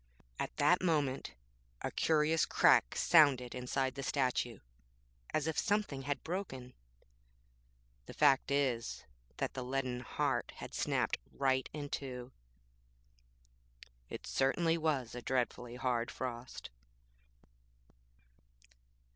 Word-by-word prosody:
At - - -4
that 175 +5 +4
moment 145 - 0 0.5
a - - -2
curious 160 0 +2
crack - - +4
sounded 140 -7 +5
inside 130 +1 -1
the 140 - -6
statue, 125 -4 0 0.7
as 155 - 0
if 160 -1 0
something 205 -10 0
had 140 0 -3
broken. 135 -9 -5 1.3
The - - -9
fact 140 -3 +4
is 135 -5 0 0.3
that - - -2
the 130 - -4
leaden 130 -1 -2
heart 125 - -1
had - - -9
snapped - - 0
right 130 -1 +1
in 145 -1 -5
two. 130 -3 -5 1.8
It - - -7
certainly 165 +5 +2
was 150 -7 -1
a 125 - -6
dreadfully 125 -1 -1
hard 125 -2 0
frost. 120 - -6
135 Hz, 105 wpm, -34 LUFS, 125-150 Hz, 1.8 s, sounded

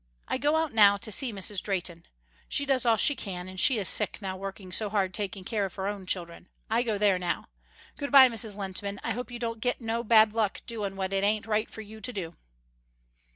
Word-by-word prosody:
I - - -1
go 295 +2 +2
out 320 -4 0
now 200 -2 +6
to 220 +1 -3
see 250 +4 +1
Mrs. 200 -1 -1
Drehten. 175 -4 -4 0.4
She 285 - +1
does 260 -3 +1
all 225 -1 +5
she 290 - +5
can, 180 -6 -6
and 185 0 -7
she 250 +5 +5
is 200 -4 0
sick - - +1
now 190 -2 -4
working 190 0 -7
so 210 +3 0
hard 195 -3 0
taking 195 -1 -3
care 210 +1 -1
of 195 - -4
her 190 - -4
own 200 -2 -4
children. 175 -1 -4 0.2
I 230 +2 +3
go 225 -4 -1
there 200 -3 +3
now. 175 -1 -3 0.5
Good 285 -1 -4
by 270 -2 +10
Mrs. 225 -3 -3
Lehntman, 200 0 -4
I - - -2
hope 250 +1 -4
you 240 - -6
don't 230 -2 -4
get 245 +1 0
no 230 0 -2
bad 220 -1 +5
luck 220 -3 -1
doin' 210 -5 -4
what 190 0 -3
it 195 0 +1
ain't 210 +1 +1
right 215 0 0
for 220 - -9
you 220 +1 -11
to 230 - -4
do." 170 -5 -5
210 Hz, 235 wpm, -28 LUFS, 190-230 Hz, 0.5 s, by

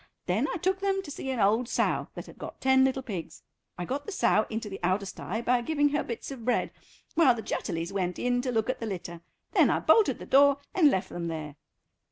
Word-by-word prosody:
Then 210 +10 +1
I - - -2
took 375 +3 0
them 390 0 0
to 295 - -8
see 270 - -5
an 260 -3 -2
old 220 +4 +2
sow - - 0
that - - -7
had - - -14
got - - -8
ten 265 0 +4
little 265 0 +1
pigs. 175 -9 -7 0.3
I 180 - -3
got 280 +8 -4
the - - -4
sow 215 - +2
into 220 -1 -4
the 195 -2 -7
outer 185 +3 +1
stye 215 +3 -5
by 245 0 +2
giving 290 +3 +2
her 290 +1 0
bits 235 +3 -6
of 255 -4 -8
bread, 245 +1 0 0.4
while 300 -8 +5
the 225 - -6
Jutterlys 170 -2 -3
went 180 -2 -1
in 245 0 +1
to 255 0 -2
look 220 -2 0
at 255 - -2
the 230 - -4
litter, 175 -4 -6 0.3
then - - +4
I - - +2
bolted 445 - +4
the - - -9
door 280 +1 +5 0.2
and 320 -6 +5
left 190 -5 -1
them 170 -1 -4
there." 155 -3 -5
235 Hz, 240 wpm, -28 LUFS, 190-275 Hz, 0.4 s, while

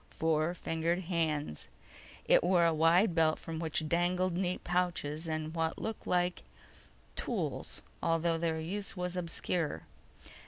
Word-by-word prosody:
Four 160 +1 +1
fingered 165 +1 -1
hands. 160 - -1 0.6
It - - +5
wore 175 -1 +4
a 165 - +4
wide 170 +5 +4
belt 160 -1 +3
from 165 -1 -6
which 160 -1 -1
dangled 175 +2 +1
neat 180 0 -1
pouches 170 -3 -1
and 155 0 -2
what 165 -1 -1
looked 220 -1 -5
like 180 0 +1 0.7
tools, - - -3 0.2
although 165 0 +1
their 165 -1 0
use 195 +5 -3
was 180 0 -2
obscure. 170 -2 -2
170 Hz, 130 wpm, -32 LUFS, 160-180 Hz, 0.7 s, It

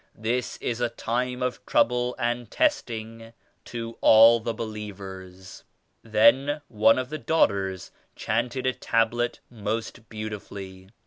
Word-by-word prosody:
This 120 +3 -2
is 120 0 -3
a 120 - +1
time 125 +2 -2
of 125 0 -3
trouble 125 +1 +2
and 120 0 -2
testing 115 - -2 0.3
to 115 -1 -7
all 115 +1 +7
the 115 +1 -3
believers." 95 -4 -8 0.4
Then 135 +7 +3
one 110 +1 +4
of 130 0 -3
the 155 - -5
daughters 100 - 0 0.2
chanted 120 +4 -2
a 130 - +2
Tablet 120 +1 0
most 110 +1 -5
beautifully. 100 -3 -8
115 Hz, 120 wpm, -26 LUFS, 105-125 Hz, 0.4 s, all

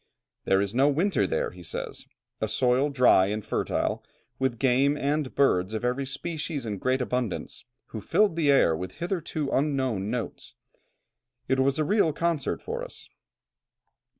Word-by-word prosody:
"There 95 0 +3
is 100 +1 -2
no 135 +3 +4
winter 155 - +1
there," - - -1
he 90 - -13
says; 85 - -6 0.3
"a 110 - +1
soil 125 +5 +2
dry 125 -8 +5
and 105 +1 -3
fertile, - - -1 0.4
with 130 -3 0
game, 135 +3 +3
and 145 -1 -1
birds 105 -7 +2
of 110 - -3
every 130 +2 -1
species 150 -1 -4
in 105 -3 -4
great 130 +3 +1
abundance, 125 -4 -3 0.2
who 110 - -6
filled 205 - +2
the 160 -4 +1
air 135 - +5
with 90 +3 -6
hitherto 170 - -3
unknown 130 -8 0
notes; 120 -1 -5 0.9
it 130 0 +1
was 135 +2 +2
a 155 - +1
real 195 -4 +2
concert 165 -3 -1
for 475 +2 -4
us. - - -10
130 Hz, 155 wpm, -27 LUFS, 110-150 Hz, 0.9 s, dry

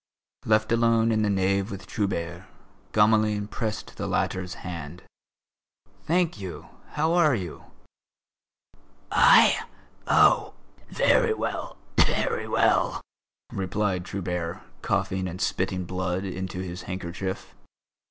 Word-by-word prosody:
Left 110 0 +2
alone 115 -1 +3
in 110 -1 +2
the 105 - +1
nave 100 +1 +1
with 95 -2 -7
Trubert, 90 -3 -3 0.4
Gamelin 105 -1 +3
pressed 110 0 -5
the - - -3
latter's 90 -1 -1
hand. 85 0 -7 1.0
"Thank 170 - +1
you. 95 -3 -8 0.2
How 160 +2 +1
are 160 -6 +4
you?" 90 -7 -6 1.5
"I? - - +6 0.5
Oh! - - +4 0.3
Very - - +3
well, - - -4 0.2
very - - +2
well!" - - +2 0.5
replied 95 -1 -1
Trubert, 90 -3 -4 0.2
coughing 95 0 -1
and 90 +1 -6
spitting 90 -1 -1
blood 95 +1 -2
into 95 0 -4
his 90 -1 -6
handkerchief. 95 +1 -5
95 Hz, 105 wpm, -26 LUFS, 90-110 Hz, 1.5 s, I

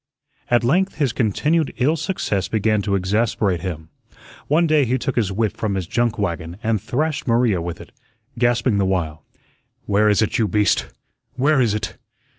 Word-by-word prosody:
At 120 0 +3
length 185 +10 +1
his 140 -6 0
continued 150 - 0
ill 140 +5 +2
success 140 - -2
began 110 0 +1
to 100 -1 0
exasperate 100 -1 0
him. 80 -4 -6 0.6
One 160 +4 +3
day 155 -2 +3
he 125 +1 0
took 135 +1 -3
his 105 -5 +1
whip 105 +1 -1
from 105 -3 -2
his 95 -2 -2
junk 120 +5 0
wagon 85 -3 -3
and 110 -3 0
thrashed 145 +6 -2
Maria 115 -6 +2
with 85 0 -5
it, - - -12 0.5
gasping 120 -2 +2
the 100 - +2
while, 80 -5 -2 0.6
"Where 105 +1 +3
is 105 +1 +3
it, 110 - -1
you 110 - +2
beast? 105 +1 +1 0.5
Where 135 +2 +3
is 110 -4 +2
it? 105 - -5
110 Hz, 175 wpm, -21 LUFS, 95-130 Hz, 0.6 s, At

